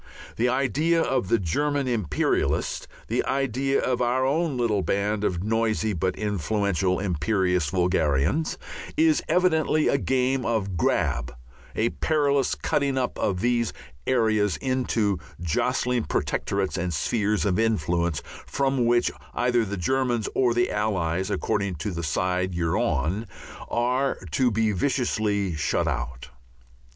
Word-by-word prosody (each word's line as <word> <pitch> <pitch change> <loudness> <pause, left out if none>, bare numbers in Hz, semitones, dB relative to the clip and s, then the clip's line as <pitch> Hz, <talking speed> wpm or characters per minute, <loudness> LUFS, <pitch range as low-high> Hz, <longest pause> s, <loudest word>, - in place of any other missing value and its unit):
The 120 +2 +1
idea 145 +6 +1
of 130 - 0
the 115 - +3
German 140 - 0
imperialist, 100 - 0 0.2
the - - 0
idea 135 0 0
of 125 -1 0
our 125 +2 +2
own 150 0 0
little 110 -5 +1
band 100 +2 0
of 90 -3 -1
noisy 110 0 0
but 90 +1 -1
influential 100 -2 0
imperialist 90 -2 0
vulgarians, 90 - +1 0.4
is 315 -1 +4
evidently 160 -4 +2
a 140 - +2
game 130 0 +1
of 105 -6 -1
grab, 60 -6 0 0.4
a 115 +2 +2
perilous 140 -3 +1
cutting 140 -2 0
up 125 -2 -1
of 95 -3 0
these 120 -2 +1 0.3
areas 110 -5 +2
into 120 - 0 0.2
jostling 120 +8 0
protectorates 100 -1 -1
and 90 -2 -2
spheres 105 +6 0
of 95 -1 +1
influence, 85 -7 0 0.2
from 135 -3 +1
which 120 0 +3 0.2
either 120 -1 +2
the 100 -1 -4
Germans 120 +3 0
or 125 -2 +2
the 120 0 +2
Allies 95 -4 -1
(according 100 -4 -1
to 80 +7 -4
the 85 -1 -4
side 90 +3 -1
you 85 -1 0
are - - +1
on) 100 +8 0 0.4
are 125 +3 +1
to 125 - +3
be 110 -1 +1
viciously 105 -4 0
shut 75 0 0
out. 65 -1 -4
110 Hz, 135 wpm, -25 LUFS, 95-130 Hz, 0.4 s, is